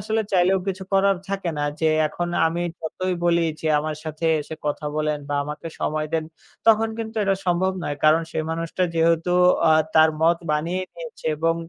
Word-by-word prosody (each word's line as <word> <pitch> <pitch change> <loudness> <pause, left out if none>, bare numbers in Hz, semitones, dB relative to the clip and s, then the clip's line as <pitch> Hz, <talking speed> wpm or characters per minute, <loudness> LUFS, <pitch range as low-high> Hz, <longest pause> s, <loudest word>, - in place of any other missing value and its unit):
আসলে 220 +3 -1
চাইলেও 185 +1 +4
কিছু 190 0 -3
করার 195 0 +4
থাকে 195 -3 -2
না 145 - 0 0.2
যে 160 - +3 0.2
এখন 175 +3 -3 0.2
আমি 170 +2 -1 0.2
যতই 185 +3 -3
বলি 170 0 +3 0.2
যে - - -4
আমার 155 +1 -3
সাথে 155 +1 -5 0.2
এসে 150 +2 -7
কথা 150 +1 -2
বলেন 155 -1 0
বা 145 - -1
আমাকে 150 +3 -6
সময় 155 0 -1
দেন, 160 -1 0 0.4
তখন 225 0 +5
কিন্তু 225 0 -5
এটা 195 -1 +2
সম্ভব 185 +2 +2
নয়। 145 - -3
কারণ 155 +2 +5
সেই 155 - -2
মানুষটা 165 +2 -2
যেহেতু 165 +1 +2 0.4
আ - - +7 0.2
তার 160 0 +6
মত 170 +1 +4 0.2
বানিয়ে 170 +5 -1
নিয়েছে - - -9
এবং 165 +2 +1
165 Hz, 185 wpm, -23 LUFS, 155-190 Hz, 0.4 s, আ